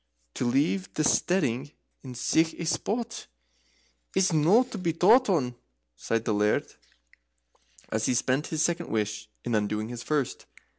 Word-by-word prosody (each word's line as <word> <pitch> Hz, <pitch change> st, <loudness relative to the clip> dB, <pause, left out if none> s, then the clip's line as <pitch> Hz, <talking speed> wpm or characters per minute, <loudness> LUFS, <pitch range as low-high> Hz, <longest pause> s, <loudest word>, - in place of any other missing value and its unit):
"To 125 Hz, -, -2 dB
leave 150 Hz, +10 st, +1 dB
the 155 Hz, -, +1 dB
steading 145 Hz, -5 st, +1 dB, 0.3 s
in 130 Hz, -2 st, -8 dB
sic 160 Hz, +6 st, +1 dB
a 170 Hz, -, -5 dB
spot 230 Hz, +8 st, -2 dB, 0.9 s
is 190 Hz, -2 st, +3 dB
no 170 Hz, +11 st, +5 dB
to 250 Hz, -5 st, -8 dB
be 170 Hz, -3 st, -1 dB
thought 220 Hz, +9 st, +5 dB
on," 135 Hz, -10 st, +1 dB, 0.4 s
sighed 115 Hz, -, -2 dB
the 110 Hz, -, +1 dB
Laird, 105 Hz, +1 st, +1 dB, 1.2 s
as 110 Hz, 0 st, -1 dB
he 125 Hz, -, +1 dB
spent 130 Hz, +4 st, 0 dB
his 160 Hz, -1 st, 0 dB
second 170 Hz, 0 st, -1 dB
wish 105 Hz, 0 st, -2 dB, 0.2 s
in 120 Hz, -, -2 dB
undoing 105 Hz, +1 st, -1 dB
his 120 Hz, -1 st, -6 dB
first. 145 Hz, -3 st, -2 dB
145 Hz, 150 wpm, -27 LUFS, 115-175 Hz, 1.2 s, no